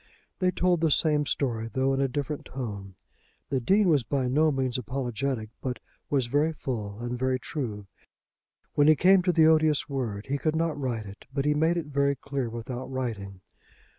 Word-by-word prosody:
They 185 -1 +3
told 180 -2 +1
the 165 - +3
same 150 -1 +2
story, 115 -5 -1
though 135 0 +1
in 135 - +1
a 135 - +3
different 145 +3 -4
tone. 100 -7 -6 0.5
The 135 - +1
Dean 195 - +3
was 150 -5 +4
by 130 +2 -1
no 155 +5 +3
means 130 -2 -1
apologetic, 125 -2 -3
but 130 -1 -3 0.3
was 135 -4 +2
very 145 +6 +2
full 110 -9 -4
and 120 0 -3
very 130 0 +1
true. 115 -6 -5 0.9
When 145 0 +4
he 155 - +7
came 185 +4 +5
to 180 0 +2
the 165 -2 +5
odious 155 -2 +4
word 120 -8 -3
he 140 +1 -2
could 155 +1 0
not 165 -1 0
write 125 -6 -3
it, 100 +1 -12
but 140 0 -1
he 150 - +3
made 160 +3 +2
it 170 - -2
very 140 -1 +1
clear 135 -2 -3
without 120 +2 -6
writing. 105 -7 -4
135 Hz, 190 wpm, -27 LUFS, 120-150 Hz, 0.9 s, he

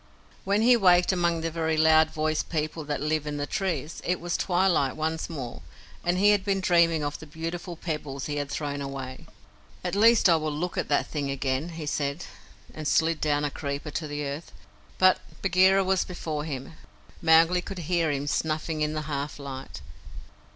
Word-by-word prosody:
When 200 +3 +2
he 245 +1 +7
waked 180 -5 +5
among 170 -2 +1
the 165 0 -2
very 160 -1 -1
loud 160 0 +5
voiced 155 0 -1
peoples 155 -1 -3
that 145 -2 -2
live 155 0 -1
in 145 0 -3
the 145 - -2
trees, 165 -4 -3
it 180 0 0
was 175 +1 -2
twilight 175 -7 +2
once 160 +1 -2
more, 125 - -6 0.4
and 175 +1 +1
he 205 +2 +5
had 205 -2 +2
been 195 -1 0
dreaming 170 -4 +3
of 145 0 -3
the 160 - -11
beautiful 165 +3 -5
pebbles 150 -5 -4
he 145 -1 -3
had 145 -1 -3
thrown 145 -1 -3
away. 135 -2 -6 0.6
"At 180 - -2
least 225 +2 +5
I 170 -2 +5
will 155 -1 -2
look 170 +5 -3
at - - -1
the 145 - +3
thing 145 -3 -4
again," 135 +3 -1
he 155 - -5
said, 145 +2 -2 0.5
and 155 -1 -5
slid 160 +1 +2
down 150 -1 +1
a 145 - -2
creeper 140 +1 -4
to 155 +2 -3
the 145 0 -4
earth; 140 +4 -6 0.5
but 185 0 +5 0.2
Bagheera 190 +1 +4
was 190 -1 +2
before 155 -4 -4
him. 135 -1 -6 0.5
Mowgli 165 +2 +5
could 195 +1 -7
hear 170 -1 +1
him 140 -1 -1
snuffing 155 +1 -1
in 150 0 0
the 155 0 -3
half 145 -1 -4
light. 135 -2 -8
155 Hz, 190 wpm, -27 LUFS, 145-175 Hz, 0.6 s, he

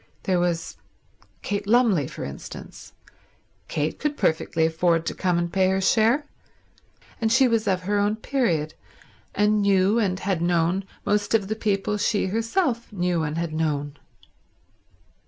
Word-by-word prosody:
There 185 -2 +1
was 175 -1 -2 0.7
Kate 205 0 -3
Lumley, 215 - +3
for - - -7
instance. 70 0 -9 0.7
Kate 150 +1 -2
could 295 0 -2
perfectly 160 0 +1
afford 165 0 +1
to - - -2
come 180 -2 0
and 170 0 -2
pay 190 -1 +3
her 190 0 +1
share; 230 +8 +3 1.0
and 220 -1 +1
she 260 +2 +5
was 230 -2 0
of 185 -2 +1
her 205 +2 0
own 205 +1 +1
period 205 - -1 0.6
and 210 0 +3
knew, 200 +2 +3
and 190 -4 0
had 190 -4 -1
known, 175 +2 +1 0.2
most 205 +2 +1
of 205 -3 0
the 220 - -1
people 210 -1 -1
she 205 0 +1
herself 230 - -1
knew 180 -4 0
and 155 0 -3
had 165 -2 -2
known. 145 -2 -2
195 Hz, 150 wpm, -24 LUFS, 170-220 Hz, 1.0 s, she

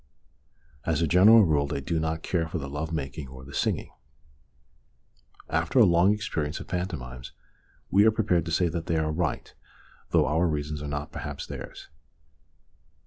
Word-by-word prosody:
As 80 0 0
a - - +2
general 105 +7 +7
rule 75 -3 +2
they 70 - -3
do 80 +4 -2
not 80 0 -2
care 85 -3 -1
for - - -4
the 70 - -5
love 75 +4 -4
making 70 -2 -4
or 65 0 -11
the 70 - -12
singing; - - -1 1.6
after 80 +10 -1
a 120 - +8
long 85 +2 +4
experience 80 -8 -2
of - - -9
pantomimes 65 -9 -5 0.6
we 100 +2 +6
are - - +6
prepared 90 -6 +1
to 85 - -4
say 90 +2 +2
that 85 0 -4
they 85 - +1
are 80 -1 0
right, 80 0 -2 0.6
though - - +3
our 80 +4 +2
reasons 75 -1 -3
are 75 - -5
not 75 0 -4
perhaps - - -6
theirs. - - -9
80 Hz, 170 wpm, -27 LUFS, 75-90 Hz, 1.6 s, a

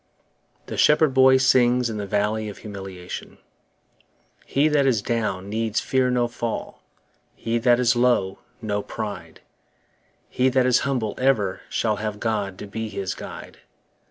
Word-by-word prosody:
The - - -6
Shepherd 150 -2 +4
Boy 130 0 +6
sings 125 -1 +3
in 110 -2 -4
the 100 -1 -4
Valley 105 +2 -1
of 100 - -9
Humiliation 95 -4 -8 1.1
HE 140 +3 +2
that 145 -2 +3
is 115 -6 +1
down 105 -5 -2
needs 110 +1 -1
fear 130 -1 +1
no 125 -1 +1
fall, 120 -1 -5 0.5
He 115 +1 -2
that 120 0 +4
is 120 -1 +3
low, 120 -6 +1 0.2
no 105 -1 -1
pride; 105 -1 -7 0.9
He 130 +1 +1
that 130 0 +2
is 125 -1 +4
humble 125 -7 -1
ever 120 -8 +1
shall 110 -2 0
Have 105 0 -4
God 105 -4 -2
to - - -7
be 110 +2 -5
his 100 -2 -3
guide. - - -10
115 Hz, 150 wpm, -23 LUFS, 105-125 Hz, 1.1 s, Boy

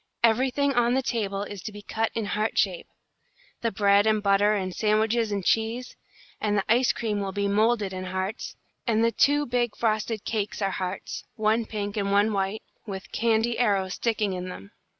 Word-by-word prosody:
Everything 260 +5 +3
on 240 0 +3
the 265 - +1
table 200 -5 -1
is 205 -2 -7
to 215 - -6
be 205 0 -10
cut 225 +2 -1
in 225 -2 -1
heart 215 +2 -1
shape, 185 -4 +1 0.7
the 230 - +1
bread 200 +1 +4
and 215 -1 +2
butter 200 +1 +4
and 185 -2 -2
sandwiches 220 +2 +1
and 200 -3 -2
cheese; 225 +3 0 0.5
and 210 -1 +1
the 195 - +2
ice 240 +3 +4
cream 215 -3 -2
will 195 -1 -2
be 200 +1 -1
moulded 210 -1 +2
in 185 0 -5
hearts, 190 +4 -4 0.3
and 225 -1 +3
the 230 - +3
two 290 +4 +3
big 240 -2 -1
frosted 215 -1 -1
cakes 210 -2 -2
are 195 -2 0
hearts, 185 +1 -4
one 220 0 +1
pink 205 -1 -4
and 200 -1 0
one 205 +2 +3
white, 195 +2 -1 0.2
with 190 -1 -7
candy 230 +1 +1
arrows 195 -5 +1
sticking 220 -4 0
in 180 0 -4
them. 100 - -9
215 Hz, 190 wpm, -26 LUFS, 200-230 Hz, 0.7 s, bread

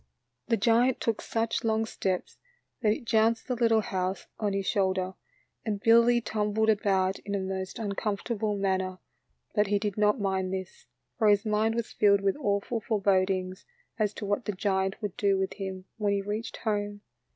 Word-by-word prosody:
The 230 -1 +2
giant 235 +4 +3
took 230 -2 -1
such 225 0 -1
long 220 0 +1
steps 190 -4 -3 0.4
that 215 -3 +3
it 235 +3 -3
jounced 225 0 +2
the 255 - 0
little 230 -2 +3
house 185 -2 -2
on 210 -2 0
his 195 -1 -1
shoulder, 190 -2 0 0.5
and 210 -3 -2
Billy 235 +2 +5
tumbled 220 -1 +1
about 195 -2 +1
in 200 0 -4
a - - 0
most 190 0 -4
uncomfortable 210 0 -2
man 195 -1 +1
ner, 185 0 -4 0.6
but 210 -2 +2
he 205 +1 +2
did 205 -1 -3
not 210 +3 +3
mind 190 -2 -1
this, 190 -1 -6 0.3
for 220 - +4
his 205 +1 +4
mind 215 +1 +1
was 235 -1 -2
filled 200 -1 +4
with 195 -1 +1
awful 205 -3 -1
forebodings 190 -3 +1 0.4
as 210 -2 +2
to - - -5
what 205 +4 -1
the 210 - -2
giant 190 0 0
would 205 -3 -3
do 200 -2 +2
with 190 0 -1
him 190 -2 -6
when 205 -2 +1
he 200 - 0
reached 210 +3 -4
home. 205 -2 -2
205 Hz, 180 wpm, -28 LUFS, 190-220 Hz, 0.6 s, Billy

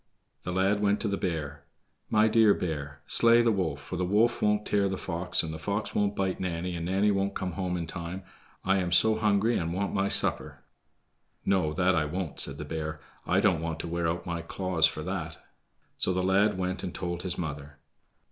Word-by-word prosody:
The 90 - -5
lad 95 +3 +2
went 105 0 +2
to 115 - 0
the 100 - 0
bear. 75 -6 -4 0.5
"My 110 +1 +4
dear 110 -2 +5
bear, 75 -4 -4
slay 115 0 +5
the 115 - +3
wolf, 85 -8 -1
for 70 +6 -6
the 90 - -1
wolf 105 +6 +2
won't 105 0 +2
tear 100 -1 +1
the 95 - -3
fox, 90 0 0
and 80 -1 -4
the 80 - -7
fox 100 +5 -3
won't 105 0 +1
bite 95 -1 -1
Nanny, 90 0 -3
and 85 0 -4
Nanny 100 +3 +2
won't 100 0 -1
come 95 -1 -3
home 90 0 -2
in 85 - -3
time. 85 +3 -6 0.4
I 95 0 +2
am 90 -2 -1
so 110 +5 +4
hungry 110 +1 +2
and 85 0 -2
want 100 +1 -2
my 100 0 +1
supper." - - +1 0.8
"No, 95 -6 +2
that 90 +4 +2
I 80 -3 +1
won't," 85 +1 -4
said - - -1
the - - -6
bear; 80 -1 -4 0.3
"I 90 +3 +3
don't 90 -6 +2
want 80 -1 -3
to - - -6
wear 85 0 -1
out 85 +1 -2
my 85 -1 -3
claws 90 -1 +2
for - - -6
that." - - -4 0.6
So 95 - 0
the 90 0 0
lad 100 +2 +3
went 90 0 -2
and 90 - -5
told 85 -1 -3
his 90 -1 -4
mother. 75 -3 -6
90 Hz, 215 wpm, -28 LUFS, 85-100 Hz, 0.8 s, dear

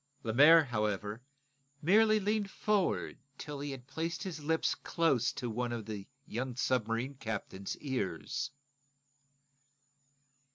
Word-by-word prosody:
Lemaire, 145 +9 +7
however, 105 -3 -2 0.6
merely 215 +5 +5
leaned 210 0 0
forward 205 -1 0
until 145 0 -7
he 145 +1 -4
had 135 -3 -7
placed 165 +7 -3
his 175 -6 -5
lips 160 +2 +2
close 135 -8 +1
to 125 - -4
one 120 +1 -2
of 115 -3 -4
the 105 -3 -6 0.2
young 125 +2 -3
submarine 125 +1 0
captain's 110 -6 -5
ears. 125 - -2
130 Hz, 115 wpm, -33 LUFS, 115-165 Hz, 0.6 s, Lemaire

